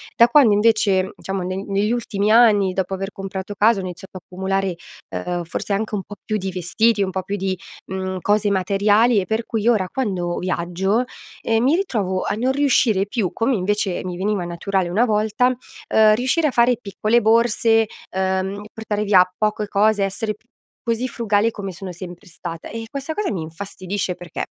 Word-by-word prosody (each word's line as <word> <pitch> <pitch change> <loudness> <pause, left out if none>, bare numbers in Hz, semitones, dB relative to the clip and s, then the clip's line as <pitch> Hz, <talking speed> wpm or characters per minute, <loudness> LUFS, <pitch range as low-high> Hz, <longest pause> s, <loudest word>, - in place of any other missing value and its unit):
da 235 - +7
quando 260 -8 +6
invece, 205 -3 +3
diciamo, 195 0 -4
ne 185 +2 -3
negli 200 +2 0
ultimi 215 -3 0
anni, 210 -5 +5
dopo 190 0 -2
aver 195 +1 -4
comprato 195 +1 -6
casa, 215 +1 +4
ho - - -2
iniziato 185 +2 -8
ad 180 - -12
accumulare, 190 0 -2 0.3
ehm, 170 - -3
forse 175 +4 -4
anche 215 +2 -1
un 195 - -3
po' 205 - -10
più 215 - -1
di 190 -1 -3
vestiti, 200 +5 +1
un 190 - -2
po' 190 0 -3
più 200 +2 -3
di, 190 -1 -2 0.3
mhmm, 190 0 -3
cose 205 0 +2
materiali, 205 +4 +3
e 190 - -2
per 220 +4 -2
cui 225 -1 -2
ora 210 -6 +3
quando 185 -9 -2
viaggio, 185 +5 0 0.4
ehm, 225 0 +1
mi 275 +5 +4
ritrovo 205 - -1
a 205 - -1
non 250 +4 +1
riuscire 255 -8 +2
più, 205 -4 -1
come 235 +2 +1
invece 200 0 -1
mi 180 -1 -5
veniva 195 0 -1
naturale 175 +1 -1
una 215 +8 +2
volta, 215 +2 +2
uhm, 220 -3 +2
riuscire 260 +7 +1
a - - 0
fare 240 0 +3
piccole 215 +2 +1
borse, 225 0 +3 0.2
uhm, 190 +1 -1
portare 210 -1 -3
via 195 -3 +6
poco 215 0 0
cose, 210 0 +2
essere 210 +2 -2 0.5
così 235 +2 -1
frugale 225 -2 +1
come 195 -3 -6
sono 190 +1 -7
sempre 175 0 -10
stata, 165 -1 -8
e 225 +1 -6
questa 280 +4 -4
cosa 420 +3 -2
mi 185 - -3
infastidisce 185 +3 -4
perché: 175 -2 -6
205 Hz, 185 wpm, -21 LUFS, 190-225 Hz, 0.5 s, da